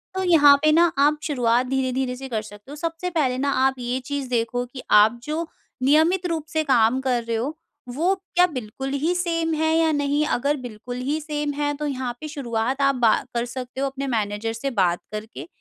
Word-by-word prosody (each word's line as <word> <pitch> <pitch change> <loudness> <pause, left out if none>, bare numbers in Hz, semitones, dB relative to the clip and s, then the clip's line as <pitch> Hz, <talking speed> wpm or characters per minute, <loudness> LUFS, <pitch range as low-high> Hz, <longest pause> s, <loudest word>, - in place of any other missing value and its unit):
तो 380 - -1
यहाँ 300 -6 +7
पे 310 - +5
ना 335 +2 +4
आप 295 +2 +4
शुरुआत 245 -4 +1
धीरे-धीरे 260 -1 -1
से 265 +1 -7
कर 220 -3 -1
सकते 210 +4 -13
हो, - - -7
सबसे 330 +3 -3
पहले 285 -7 0
ना 280 +2 0 0.2
आप 265 0 +2
ये 245 +1 -2
चीज़ 280 -2 -4
देखो 245 0 -1
कि 255 +1 -10
आप 215 +3 +6
जो 315 +4 -3 0.4
नियमित 320 +7 +3
रूप 325 -3 -3
से 315 0 +1
काम 255 -3 +3
कर 250 -3 0
रहे 230 0 -2
हो, 270 +7 -3 0.3
वो 325 +10 +1 0.2
क्या 355 +1 +6
बिल्कुल 265 -3 -6
ही 330 +4 +2
सेम 330 -2 0
है 315 +1 +1
या 325 -1 +3
नहीं, 290 0 +1
अगर 285 +2 0
बिल्कुल 245 -1 -7
ही 305 +2 0
सेम 295 -1 -3
है 290 0 -1
तो 300 - -3
यहाँ 260 -3 -3
पे 310 - -5
शुरुआत 260 -2 -2
आप 275 0 +3
बा 225 - +6 0.2
कर 235 0 -1
सकते 255 +2 -6
हो 275 - +1
अपने 275 +1 -5
मैनेजर 210 +1 -2
से 230 +5 -3
बात 175 -1 +2
करके, 210 -9 -7
270 Hz, 210 wpm, -23 LUFS, 240-305 Hz, 0.4 s, यहाँ